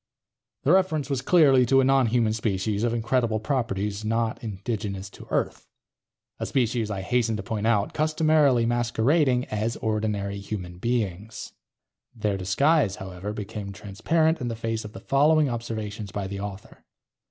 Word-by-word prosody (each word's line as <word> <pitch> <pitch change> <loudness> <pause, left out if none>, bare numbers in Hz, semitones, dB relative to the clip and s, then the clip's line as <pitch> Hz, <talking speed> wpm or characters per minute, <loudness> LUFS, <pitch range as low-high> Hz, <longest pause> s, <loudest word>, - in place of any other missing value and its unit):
The 145 - +3
reference 160 -7 +2
was 135 -2 0
clearly 135 -4 +5
to 135 +2 +5
a - - +4
nonhuman 125 -4 +3
species 105 -1 -1
of 120 - +1
incredible 115 -1 0
properties, 105 -5 -2
not 115 +1 -1
indigenous 100 -2 -4
to - - -13
Earth. - - -2 0.7
A - - -3
species, 120 -3 0
I 100 -2 -3
hasten 115 +1 0
to 105 - -5
point 110 +2 -2
out, 105 -3 +1
customarily 155 -5 +3
masquerading 125 +3 +2
as 110 +2 -1
ordinary 105 -2 -2
human 90 -3 -6
beings. 110 -2 -3 0.6
Their 105 -3 -1
disguise, 100 - +2
however, 95 +2 -6
became 105 -1 -6
transparent 155 - 0
in 125 - -2
the 115 - -3
face 115 0 -3
of 105 0 -9
the 95 - -9
following 150 +3 +3
observations 110 -4 -5
by 100 0 -3
the 100 +1 -5
author. 100 0 -8
110 Hz, 150 wpm, -25 LUFS, 100-130 Hz, 0.7 s, clearly